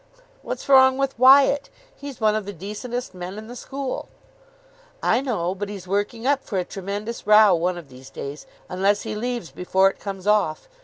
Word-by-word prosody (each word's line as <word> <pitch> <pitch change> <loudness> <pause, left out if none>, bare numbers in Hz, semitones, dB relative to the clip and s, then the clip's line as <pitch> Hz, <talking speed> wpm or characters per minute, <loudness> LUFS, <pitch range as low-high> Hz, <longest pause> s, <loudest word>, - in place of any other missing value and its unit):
"What's - - -6
wrong 265 -1 +6
with 275 -3 -2
Wyatt? 275 +2 +6 0.3
He's 280 -3 -9
one 215 -1 +3
of 215 -2 -3
the 205 - -5
decentest 215 +7 -6
men 180 +2 -7
in 215 - -8
the 240 +2 -10
school." 270 +1 -5 0.9
"I 230 +3 +3
know. 205 -10 -1
But 200 +1 -5
he's 195 -3 -8
working 205 +4 -2
up 275 0 +2
for 200 - -4
a 180 - 0
tremendous 200 +4 -6
row 210 -2 +7
one 175 +1 0
of 165 -5 -10
these 130 +1 -13
days, 140 +2 -8 0.2
unless 195 +3 +1
he 220 - -4
leaves 235 - -4
before 190 +5 +2
it - - -22
comes 195 -2 -6
off. 205 -7 +1
210 Hz, 190 wpm, -23 LUFS, 185-245 Hz, 0.9 s, row